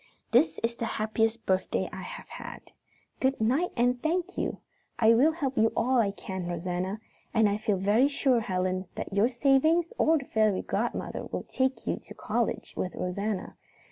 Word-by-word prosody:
"This 160 0 +4
is 235 +1 0
the 230 - -2
happiest 225 +1 0
birthday 190 0 0
I - - -6
have - - -8
had. - - -9 0.5
Good 265 +1 +1
night, 265 +11 +2
and 245 +1 +2
thank 355 +3 -1
you! - - -2 0.4
I 225 0 +6
will 270 +8 +5
help 280 -5 -2
you 225 +1 +4
all 255 +1 +3
I 215 -4 +3
can, 190 -2 -5
Rosanna, 180 +3 -3 0.4
and 220 -1 +5
I 205 0 +1
feel 210 -2 0
very 210 +8 +4
sure, 275 -3 +2
Helen, 185 -2 -1
that - - -5
your 205 +4 +3
savings 290 +7 +3
or 320 +1 +4
the 275 - -5
fairy 215 -5 +1
godmother - - -2
will - - -4
take 260 0 -1
you - - -1
to - - -12
college - - -2
with 185 - -3
Rosanna. 200 +2 -3
225 Hz, 175 wpm, -28 LUFS, 195-265 Hz, 0.5 s, I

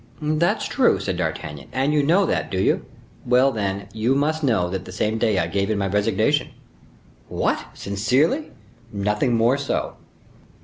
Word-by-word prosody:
"That's 155 +3 +1
true," - - +2
said - - -3
D'Artagnan. 75 -2 -4
"And 135 +3 0
you 150 - +3
know 175 +7 +3
that, 80 - -1
do 95 - -2
you? - - +1 0.4
Well, 125 +2 +4
then, 100 -3 -3
you 115 +4 +1
must 155 +3 0
know 110 - +2
that 95 +1 -4
the - - -9
same 105 +3 -1
day 110 -3 +2
I 85 - +2
gave 100 +4 -1
in 110 - 0
my 100 - 0
resignation!" 100 +1 +1 0.8
"What, - - 0
sincerely?" 130 - 0 0.4
"Nothing 105 +4 0
more 120 +4 +3
so." 140 - -2
110 Hz, 165 wpm, -22 LUFS, 100-140 Hz, 0.8 s, Well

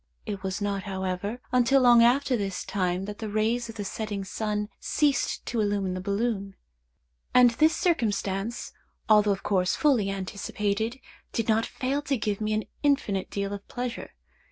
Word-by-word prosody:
It 205 -3 -4
was 190 +1 -3
not, 200 -1 -1
however, 190 +4 -3
until 250 +2 +4
long 240 -2 +7
after 255 +2 +4
this 195 -4 -3
time 185 -1 -1
that 205 0 -7
the 220 - -4
rays 225 +3 0
of 225 - -8
the 205 - -4
setting 205 -1 -4
sun 210 +1 -2
ceased 290 -4 0
to 235 -2 -1
illumine 200 -3 0
the 185 - -4
balloon; 200 0 -1 0.8
and 250 -1 +7
this 310 +7 +3
circumstance, 215 - -1 0.3
although 210 -1 +5
of 195 -1 0
course 185 -2 +1
fully 255 -10 +3
anticipated, 205 +4 -2 0.3
did 230 - -1
not 225 0 +2
fail 270 +3 -2
to 280 -2 -1
give 210 -2 -2
me 215 0 0
an 215 0 0 0.2
infinite 270 -10 +1
deal 200 0 -3
of 200 0 -8
pleasure. 245 0 -5
210 Hz, 165 wpm, -27 LUFS, 200-240 Hz, 0.8 s, long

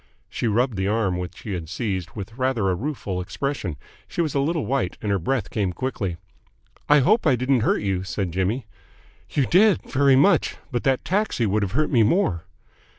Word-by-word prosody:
She 120 - -2
rubbed 115 +1 +1
the 95 +1 0
arm 100 -4 +1
which 90 -1 -7
he 105 - -5
had 85 -4 -5
seized 95 -4 -3
with 110 +2 -7
rather 125 -7 +1
a - - +1
rueful 100 -5 -3
expression. 105 - -3 0.3
She - - -8
was 160 -4 +1
a 140 - +1
little 155 +2 0
white, 130 -8 -1
and 105 - -2
her 100 - +1
breath 115 +5 -1
came 100 -5 -1
quickly. 100 -5 -3 0.7
"I 145 -1 +6
hope 210 - +3
I 135 - +5
didn't 130 +1 +2
hurt 110 - +1
you," 95 -2 -1
said 95 0 -3
Jimmy. 95 +7 -1 0.6
"You 140 - +1
did. 195 - +4
Very 140 0 +3
much. 135 - +3 0.2
But 120 -2 -2
the 135 -1 +4
taxi 190 - 0
would 105 +1 +1
have 100 -1 -2
hurt 155 +5 +1
me 120 -5 +4
more." 110 - +2
115 Hz, 200 wpm, -23 LUFS, 95-135 Hz, 0.7 s, I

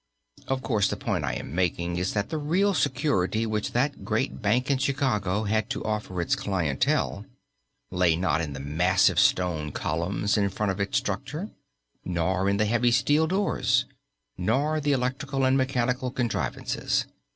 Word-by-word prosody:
Of 135 -1 -1
course 105 -6 +2
the - - -2
point - - -2
I - - -1
am 70 - -6
making 85 -1 0
is 90 +1 -1
that 100 -1 -1
the 160 - -2
real 185 +7 +2
security 125 - +1
which 105 -1 -2
that 140 +4 0
great 65 - -1
bank 125 +6 +1
in 135 - +1
Chicago 110 -8 0
had 110 +2 0
to 135 - -3
offer 105 -4 -3
its 85 - +1
clientele 85 -8 0 0.7
lay 90 -3 +3
not 85 -1 +1
in 75 -4 -4
the - - -6
massive 85 +6 +2
stone 80 -5 +2
columns 90 +8 -1
in 100 -1 +2
front 100 +1 -1
of 95 - -5
its 100 0 0
structure; 140 - -3 0.5
nor 90 +2 0
in 100 - +1
the 105 - +2
heavy 120 +3 +2
steel 150 +6 +3
doors; 190 +3 +1 0.5
nor 145 +12 +1
the 145 0 +1
electrical 135 +1 -1
and 130 0 +3
mechanical 130 -1 0
contrivances. 120 -3 -1
105 Hz, 160 wpm, -26 LUFS, 90-135 Hz, 0.7 s, lay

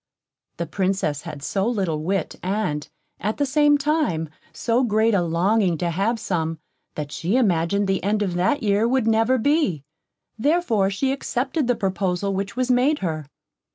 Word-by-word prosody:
The 170 - -2
Princess 175 -3 -1
had 140 - -8
so 195 +6 0
little 190 -10 -1
wit, 190 +4 -1
and, 185 -6 -2 0.3
at 210 +3 -2
the 285 - +1
same 295 +1 +4
time, 285 - 0 0.2
so 235 +2 0
great 220 -1 +2
a 195 - +3
longing 175 +2 +1
to 170 +2 -1
have 200 +8 0
some, 165 -7 -2 0.4
that 150 -1 -5
she 175 +9 -1
imagined 200 -3 +2
the 195 -1 0
end 210 +2 +1
of 185 -3 -2
that 185 +10 +1
year 205 +2 +2
would 255 -1 +1
never 225 +3 +3
be; 250 - +1 0.6
therefore 240 - +2
she 265 +7 0
accepted 270 +1 -1
the 245 - +2
proposal 195 -1 -1
which 195 +1 -3
was 255 0 0
made 260 +5 +3
her. 155 -4 -3
200 Hz, 165 wpm, -23 LUFS, 175-245 Hz, 0.6 s, same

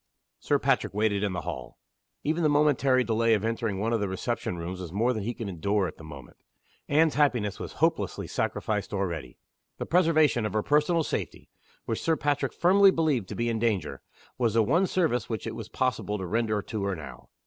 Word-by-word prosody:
Sir - - +1
Patrick - - 0
waited 105 -1 +1
in 100 -2 -1
the 85 - -3
hall. 75 -7 -7 0.5
Even 160 +3 0
the 155 - +3
momentary 140 -3 +3
delay 115 0 +2
of 105 +1 -2
entering 115 -3 -1
one 115 +3 0
of 115 - +1
the 100 -2 -1
reception 95 -1 -3
rooms 90 +2 -5
was 85 -3 -7
more 115 +6 +1
than 110 - -3
he 115 +4 -3
could 115 -4 -5
endure 100 +2 0
at 80 - -9
that - - -12
moment. 70 -5 -11 0.5
Anne's 155 +2 +4
happiness 125 -9 +1
was - - -6
hopelessly - - 0
sacrificed 105 -1 -2
already. 85 -10 -3 0.4
The - - -4
preservation 155 -8 +3
of 105 -3 -2
her 110 - 0
personal 150 +3 +2
safety - - -5 0.3
which 115 - -2
Sir 165 - +2
Patrick 145 -3 0
firmly 195 +3 +5
believed 150 - 0
to - - -5
be 120 - -1
in 115 -1 -1
danger 105 -9 -1 0.4
was 115 -3 +1
the 115 - +5
one 170 - +2
service 155 - 0
which 110 -4 -3
it - - -4
was - - -7
possible 125 -4 -1
to 95 - -5
render 110 +1 0
to 110 -3 -4
her 100 -1 -1
now. 80 -3 -10
115 Hz, 205 wpm, -27 LUFS, 100-145 Hz, 0.5 s, firmly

